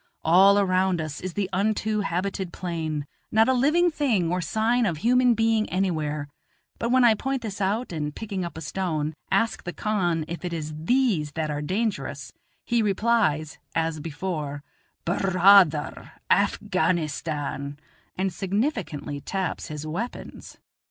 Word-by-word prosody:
All 190 Hz, +5 st, +6 dB
around 185 Hz, -2 st, +2 dB
us 155 Hz, -2 st, -5 dB
is 185 Hz, -1 st, -5 dB
the 200 Hz, -2 st, 0 dB
unto 215 Hz, +2 st, 0 dB
habited 190 Hz, -1 st, -2 dB
plain; 160 Hz, -5 st, -3 dB, 0.3 s
not 220 Hz, +1 st, +4 dB
a 260 Hz, -, +4 dB
living 310 Hz, +8 st, +3 dB
thing 230 Hz, -, +1 dB
or 180 Hz, 0 st, 0 dB
sign 225 Hz, +4 st, +1 dB
of 170 Hz, -4 st, -1 dB
human 245 Hz, +5 st, +4 dB
being 225 Hz, -1 st, +2 dB
anywhere; 155 Hz, -6 st, -1 dB, 0.5 s
but 235 Hz, -, -1 dB
when 255 Hz, +1 st, +4 dB
I 235 Hz, -2 st, +7 dB
point 265 Hz, +4 st, -2 dB
this 205 Hz, -2 st, -5 dB
out, 205 Hz, +5 st, 0 dB
and 150 Hz, -2 st, -3 dB
picking 200 Hz, -4 st, -4 dB
up 170 Hz, -2 st, -6 dB
a -, -, -6 dB
stone, 155 Hz, -1 st, -2 dB, 0.2 s
ask 205 Hz, +4 st, +1 dB
the 175 Hz, -, -5 dB
khan 175 Hz, -7 st, 0 dB
if 170 Hz, +2 st, -6 dB
it 175 Hz, -1 st, -3 dB
is 155 Hz, -2 st, -4 dB
these 165 Hz, -, +1 dB
that 155 Hz, -1 st, -2 dB
are 145 Hz, 0 st, -3 dB
dangerous, 205 Hz, +8 st, -2 dB, 0.3 s
he 235 Hz, -1 st, +2 dB
replies, 200 Hz, -7 st, +1 dB, 0.2 s
as 165 Hz, -1 st, 0 dB
before: 150 Hz, -2 st, -4 dB, 0.4 s
"Bur 175 Hz, +4 st, 0 dB, 0.2 s
raa 195 Hz, +2 st, +9 dB
ther, 150 Hz, -2 st, -6 dB, 0.2 s
Afghanistan," 145 Hz, -3 st, 0 dB, 0.4 s
and 190 Hz, -1 st, -1 dB
significantly 195 Hz, -, -2 dB
taps 190 Hz, +2 st, -3 dB
his 150 Hz, -1 st, -6 dB
weapons. 190 Hz, +11 st, -6 dB
185 Hz, 150 wpm, -25 LUFS, 155-220 Hz, 0.5 s, raa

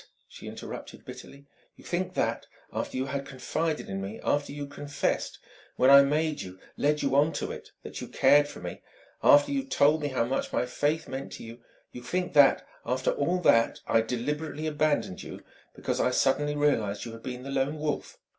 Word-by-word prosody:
she -, -, -11 dB
interrupted -, -, -8 dB
bitterly. 140 Hz, +1 st, -11 dB, 0.3 s
"You -, -, -17 dB
think 180 Hz, +1 st, -2 dB
that, 115 Hz, 0 st, -1 dB, 0.3 s
after -, -, -3 dB
you 130 Hz, -, 0 dB
had 140 Hz, +1 st, -3 dB
confided 150 Hz, +4 st, -3 dB
in 95 Hz, 0 st, -4 dB
me; 100 Hz, +3 st, -6 dB
after 145 Hz, 0 st, 0 dB
you'd 145 Hz, 0 st, -6 dB
confessed 145 Hz, 0 st, -2 dB, 0.4 s
when 130 Hz, +2 st, +5 dB
I 140 Hz, 0 st, +10 dB
made 150 Hz, +2 st, 0 dB
you, 95 Hz, 0 st, -8 dB, 0.2 s
led 150 Hz, +1 st, +1 dB
you 135 Hz, -1 st, +1 dB
on 150 Hz, +3 st, +4 dB
to -, -, -3 dB
it -, -, -9 dB
that -, -, -7 dB
you -, -, -6 dB
cared 145 Hz, +2 st, +5 dB
for -, -, -10 dB
me; -, -, -7 dB, 0.4 s
after 290 Hz, 0 st, +6 dB
you'd 275 Hz, -1 st, -2 dB
told 150 Hz, -, +4 dB
me 145 Hz, -, -1 dB
how 130 Hz, -4 st, 0 dB
much 130 Hz, +3 st, -2 dB
my -, -, +1 dB
faith 145 Hz, +5 st, -1 dB
meant 135 Hz, +1 st, -6 dB
to -, -, -8 dB
you 115 Hz, +1 st, -10 dB, 0.3 s
you 125 Hz, -, -9 dB
think 180 Hz, +9 st, -2 dB
that, 145 Hz, -2 st, +5 dB, 0.2 s
after 130 Hz, +2 st, 0 dB
all 170 Hz, +6 st, 0 dB
that, 115 Hz, -8 st, +4 dB
I 115 Hz, -, +3 dB
deliberately 150 Hz, +7 st, -3 dB
abandoned 150 Hz, -10 st, 0 dB
you -, -, -9 dB, 0.3 s
because -, -, -2 dB
I -, -, +3 dB
suddenly 145 Hz, +3 st, +1 dB
realized 115 Hz, -9 st, +1 dB
you 115 Hz, -, -6 dB
had 115 Hz, 0 st, -10 dB
been 125 Hz, 0 st, -6 dB
the 135 Hz, -, -6 dB
Lone 135 Hz, +3 st, 0 dB
Wolf 150 Hz, -1 st, -3 dB
140 Hz, 195 wpm, -28 LUFS, 125-150 Hz, 0.4 s, I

